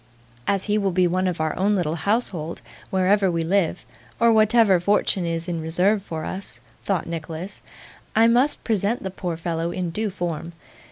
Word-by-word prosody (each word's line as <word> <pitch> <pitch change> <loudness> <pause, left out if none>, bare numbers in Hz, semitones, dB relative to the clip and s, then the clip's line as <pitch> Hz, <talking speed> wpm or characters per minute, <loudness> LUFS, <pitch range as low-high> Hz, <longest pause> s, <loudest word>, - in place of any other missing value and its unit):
'As 195 -1 +1
he 210 0 +1
will 200 -1 +1
be 180 +1 +3
one 185 +2 +1
of 180 -2 -2
our 155 -1 -1
own 205 +3 +2
little 165 -5 0
household, 175 -3 -1 0.3
wherever 190 +1 +3
we 165 -1 0
live, 180 0 0 0.3
or 235 0 +5
whatever 215 -3 +5
fortune 190 -1 +1
is 165 +1 -2
in 170 -2 -2
reserve 180 +6 +1
for 160 -4 -5
us,' 190 +1 -6 0.3
thought 195 -5 0
Nicholas, 165 +3 -6 0.5
'I 225 +1 +6
must 250 +5 +2
present 220 +1 0
the 190 - -4
poor 175 -3 -4
fellow 165 0 -2
in 175 -1 -3
due 215 +5 -2
form. 170 -3 -4
185 Hz, 175 wpm, -23 LUFS, 170-205 Hz, 0.5 s, I